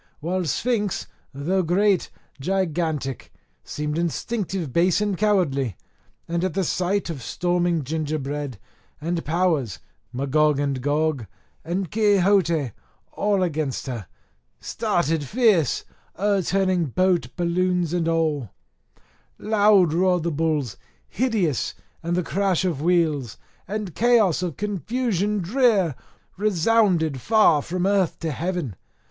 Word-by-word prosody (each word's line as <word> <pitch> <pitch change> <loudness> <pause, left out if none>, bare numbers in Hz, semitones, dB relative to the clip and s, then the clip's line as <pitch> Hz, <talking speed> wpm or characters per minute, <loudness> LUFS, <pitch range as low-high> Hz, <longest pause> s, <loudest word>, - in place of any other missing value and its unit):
While 180 +3 -2
Sphinx, 210 +2 -1 0.3
though 165 +8 0
great, 190 +3 +2 0.3
gigantic, 160 -5 -2 0.3
seemed 150 +1 -3
instinctive 175 - -2
base 175 +2 +3
and 205 -2 0
cowardly, 155 - +1 0.5
and 170 +1 -1
at 185 -2 -1
the 195 - +1
sight 185 +2 -1
of 145 -5 -7
storming 175 +2 0
gingerbread, 145 -3 -3 0.4
and 165 +2 -2
powers, 160 - 0 0.3
Magog 140 +3 +2
and 140 -2 -1
Gog, 145 -3 0 0.4
and 175 +2 -3
Quixote, 195 - +3 0.4
all 200 -2 +1
against 155 -6 -2
her, 120 -8 -5 0.5
started 170 -8 -1
fierce, 195 - +2 0.3
o'erturning 190 -2 +1
boat, 185 -1 +2
balloons, 175 -1 0
and 170 -2 0
all; 155 - 0 0.9
loud 205 -6 +4
roared 180 0 +2
the 170 - -1
bulls, 150 -6 -1 0.3
hideous, 205 - 0 0.3
and 170 +1 -1
the 180 - 0
crash 190 0 0
of 165 -6 -1
wheels, 155 -8 +1 0.3
and 205 -3 -4
chaos 220 -6 +3
of 175 -5 -3
confusion 210 0 -1
drear, 205 - +2 0.4
resounded 185 - +2
far 210 - +4
from 180 +4 -2
earth 195 -3 +2
to 165 -2 -3
heaven. 165 - -3
175 Hz, 115 wpm, -23 LUFS, 150-195 Hz, 0.9 s, loud